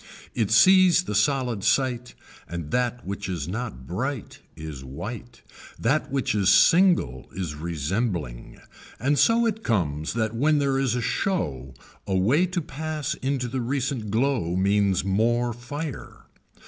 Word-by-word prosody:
It 110 -5 0
sees 185 +8 +6
the 105 - -4
solid 120 -1 +1
sight 125 -2 0 0.3
and 85 -3 -6
that 125 -1 -1
which 100 0 -5
is 85 -6 -3
not 95 - -5
bright 125 - -4 0.2
is 75 -4 -8
white, 105 - -8 0.3
that 135 +7 0
which 135 -5 0
is 100 -3 +2
single 170 - +4
is 90 -5 -3
resembling 80 - -3 0.4
and 140 +3 +1
so 230 +1 +4
it 220 -1 -2
comes 80 - -1
that 110 -1 -1
when 150 +5 +2
there 140 -2 +1
is 130 -3 +1
a 125 - -2
show 70 - -2 0.3
a 95 - 0
way 130 - +3
to 180 0 -2
pass 155 -1 -4
into 130 -2 -1
the 130 +2 -3
recent 125 -2 -2
glow 110 -6 0
means 100 -1 +2
more 120 +5 +1
fire. 140 +4 -7
115 Hz, 145 wpm, -25 LUFS, 95-140 Hz, 0.4 s, sees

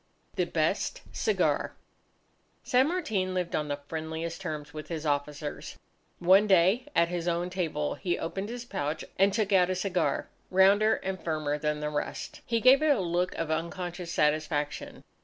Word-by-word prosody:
The - - 0
Best - - -1
Cigar 440 - 0 0.9
San 255 +2 +3
Martin 220 - -1
lived 180 -2 -1
on 150 - -1
the 145 0 -3
friendliest 160 +2 -4
terms 150 -4 -5
with 155 -1 -7
his 160 -2 -5
officers. 145 0 -3 0.4
One 190 +4 +5
day, 195 +7 +4
at 170 0 +4
his 175 -1 -3
own 175 +1 0
table, 160 -5 -1
he 175 -3 -2
opened 195 +5 -4
his 240 0 -6
pouch 150 -8 -3
and 195 +1 +5
took 205 0 0
out 180 -1 +5
a 185 - 0
cigar, 185 -1 0 0.2
rounder 200 +4 +5
and 190 0 -4
firmer 155 -2 -1
than 150 0 -1
the 150 0 -2
rest. 145 - -4
He 230 -1 +1
gave 255 +5 +6
it 310 - +3
a 280 -6 +4
look 175 +1 0
of 165 -1 -2
unconscious 170 +2 -3
satisfaction. 150 -1 -1
175 Hz, 165 wpm, -29 LUFS, 155-195 Hz, 0.9 s, gave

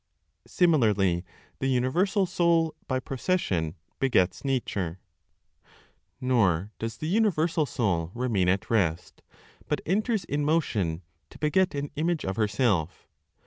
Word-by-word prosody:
SIMILARLY 105 - +2 0.4
THE 135 - -1
UNIVERSAL 175 - +2
SOUL, 170 -2 +2
BY 130 -1 -1
PROCESSION, 115 - -1 0.2
BEGETS 110 -9 +2
NATURE. 100 -10 -2 1.2
Nor 105 -7 +1
does 115 0 -4
the 155 - -4
universal 170 -6 +2
Soul 90 -11 -1
remain 115 -7 +1
at 95 +4 0
rest, 90 -6 0 0.5
but - - 0
enters 215 +3 0
in 145 +1 -1
motion 105 - 0 0.3
to - - -14
beget 175 +3 +1
an 140 0 -3
image 160 +1 -1
of 95 0 -2
herself. 105 - 0
130 Hz, 115 wpm, -27 LUFS, 95-160 Hz, 1.2 s, SIMILARLY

